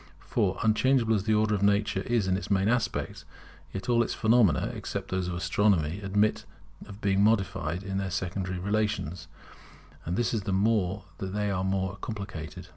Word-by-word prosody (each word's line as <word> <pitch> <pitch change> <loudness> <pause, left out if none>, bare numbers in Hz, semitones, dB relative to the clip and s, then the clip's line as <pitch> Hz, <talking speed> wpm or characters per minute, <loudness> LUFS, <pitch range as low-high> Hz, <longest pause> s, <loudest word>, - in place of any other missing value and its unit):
For, - - 0
unchangeable 115 +1 +3
as 100 -2 0
the 110 - +3
Order 105 0 +2
of 100 - 0
Nature 100 -1 +2
is 115 -1 0
in 95 - +2
its 95 - -5
main 100 -1 +2
aspects, 120 +1 -1 0.5
yet 95 -1 -6
all 120 -1 +4
phenomena, 110 - +3
except - - -5
those 95 -1 -1
of 90 - -3
Astronomy, 90 -1 +1
admit 105 +2 +1 0.4
of 100 +1 -11
being 100 0 +2
modified 95 -5 +1
in 95 0 -2
their 95 -1 -2
secondary 95 0 -3
relations, 100 -4 -1 0.8
and 85 +3 -3
this 120 - +1
the 105 -3 -2
more 100 0 +1 0.2
as 95 -1 -4
they 105 0 0
are 95 -1 -1
more 95 0 -1
complicated. 95 -4 -6
100 Hz, 170 wpm, -28 LUFS, 95-105 Hz, 0.8 s, all